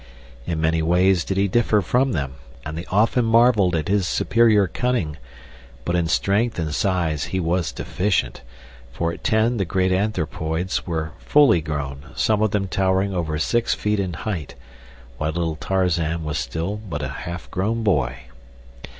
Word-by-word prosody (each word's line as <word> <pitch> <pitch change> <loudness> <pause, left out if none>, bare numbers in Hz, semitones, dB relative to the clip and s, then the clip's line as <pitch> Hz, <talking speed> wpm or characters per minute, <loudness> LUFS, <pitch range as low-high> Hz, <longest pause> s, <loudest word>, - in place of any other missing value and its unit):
In 80 -2 -1
many 80 +1 +1
ways 90 +2 +3
did 95 - -3
he 100 +1 +3
differ 110 +1 +2
from 125 +8 +1
them, 70 -5 -2 0.3
and 75 +2 -5
they 85 +2 -5
often 110 +5 +2
marveled 115 -5 +4
at 80 - -1
his 100 -2 +1
superior 110 -2 +3
cunning, 95 -7 -1 0.7
but 85 - 0
in 85 -1 +1
strength 100 +7 +1
and 80 -3 -2
size 85 -5 0
he 95 - -2
was 85 0 0
deficient; 90 -10 -1 0.5
for 85 +5 -2
at - - -11
ten 110 +2 +2
the 100 - +1
great 95 +1 0
anthropoids 90 -3 -1
were 80 -2 -2
fully 140 - +4
grown, 70 -2 -5
some 110 -1 +1
of 110 - +3
them 100 -1 -1
towering 95 +1 +1
over 80 -4 -2
six 115 +9 +1
feet 105 0 -1
in 95 -3 -2
height, 85 -3 -5 0.6
while 75 +1 -1
little 85 -1 -1
Tarzan 85 -3 0
was 75 -1 -2
still 85 +6 -3
but 105 -5 -6
a - - -1 0.2
half 85 +1 -7
grown 110 +5 -1
boy. 65 - 0
90 Hz, 165 wpm, -22 LUFS, 80-105 Hz, 0.7 s, marveled